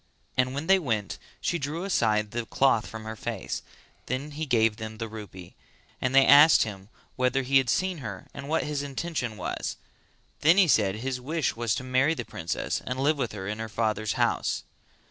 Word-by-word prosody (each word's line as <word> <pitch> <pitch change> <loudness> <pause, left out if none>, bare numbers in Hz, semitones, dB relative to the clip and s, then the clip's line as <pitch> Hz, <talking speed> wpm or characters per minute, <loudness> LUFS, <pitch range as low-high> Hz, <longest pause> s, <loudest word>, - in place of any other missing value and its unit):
And 130 +1 +1
when 145 +3 -3
they 195 +2 +5
went, 110 - -2 0.2
she 170 - 0
drew 150 +5 -3
aside 105 - +1
the 120 0 -3
cloth 130 -5 +2
from 110 0 -8
her 110 0 -6
face; - - -4 0.5
then 135 +4 -3
he 155 +2 -4
gave 115 -4 +3
them 110 -1 -7
the 115 0 -4
rupee, 100 -5 -10 0.5
and 130 +1 0
they 135 0 +7
asked 150 +3 +8
him 100 -2 -8 0.3
whether 130 +1 +1
he 135 +1 +4
had 130 -2 -1
seen 185 +2 0
her 110 -7 -7
and 140 +1 -8
what 160 - +1
his 150 -1 -2
intention 140 -5 -3
was; 90 - -4 0.6
then 165 +5 +5
he 195 -3 +6
said 105 -8 +3
that - - -7
his 130 0 -3
wish 155 +3 -1
was 115 -1 0
to 130 - -4
marry 130 +5 +2
the 120 - -5
princess 85 -1 -3
and 125 +1 -4
live 145 +2 +2
with 125 -4 -1
her 95 -2 -6
in 105 +1 -4
her 110 0 -4
father's 110 -1 -1
house! - - 0
125 Hz, 205 wpm, -27 LUFS, 110-145 Hz, 0.6 s, asked